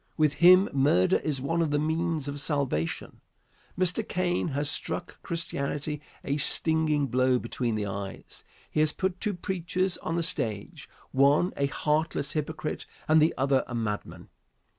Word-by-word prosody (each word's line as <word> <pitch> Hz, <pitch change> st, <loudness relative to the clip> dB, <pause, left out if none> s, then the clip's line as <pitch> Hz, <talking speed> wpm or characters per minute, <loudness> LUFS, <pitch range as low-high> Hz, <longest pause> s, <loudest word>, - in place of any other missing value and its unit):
With 155 Hz, -3 st, +3 dB
him 185 Hz, +3 st, +8 dB
murder 135 Hz, -10 st, +3 dB
is 145 Hz, -3 st, -2 dB
one 165 Hz, +6 st, 0 dB
of 165 Hz, -, +1 dB
the 145 Hz, -, +1 dB
means 160 Hz, 0 st, -1 dB
of 145 Hz, 0 st, -4 dB
salvation. 140 Hz, -, -2 dB, 0.6 s
Mr. 185 Hz, +4 st, +2 dB
Caine 180 Hz, -1 st, 0 dB
has 145 Hz, -1 st, -1 dB
struck 165 Hz, +4 st, -3 dB
Christianity 150 Hz, -3 st, -3 dB, 0.2 s
a 140 Hz, +1 st, -1 dB
stinging 155 Hz, 0 st, +2 dB
blow 130 Hz, 0 st, +2 dB
between 120 Hz, -1 st, -2 dB
the 105 Hz, -1 st, -1 dB
eyes. 100 Hz, 0 st, -7 dB, 0.3 s
He -, -, -1 dB
has 155 Hz, 0 st, +3 dB
put 190 Hz, -1 st, -2 dB
two 210 Hz, -3 st, -1 dB
preachers 185 Hz, 0 st, -1 dB
on 165 Hz, -, -3 dB
the 170 Hz, -, 0 dB
stage, 110 Hz, -10 st, -3 dB, 0.2 s
one 140 Hz, +6 st, +3 dB
a 140 Hz, -, +1 dB
heartless 150 Hz, 0 st, -1 dB
hypocrite 155 Hz, 0 st, -3 dB, 0.2 s
and 155 Hz, 0 st, +5 dB
the 160 Hz, +2 st, +3 dB
other 135 Hz, 0 st, +2 dB
a 125 Hz, -, -5 dB
madman. 105 Hz, -3 st, -4 dB
150 Hz, 155 wpm, -28 LUFS, 135-165 Hz, 0.6 s, him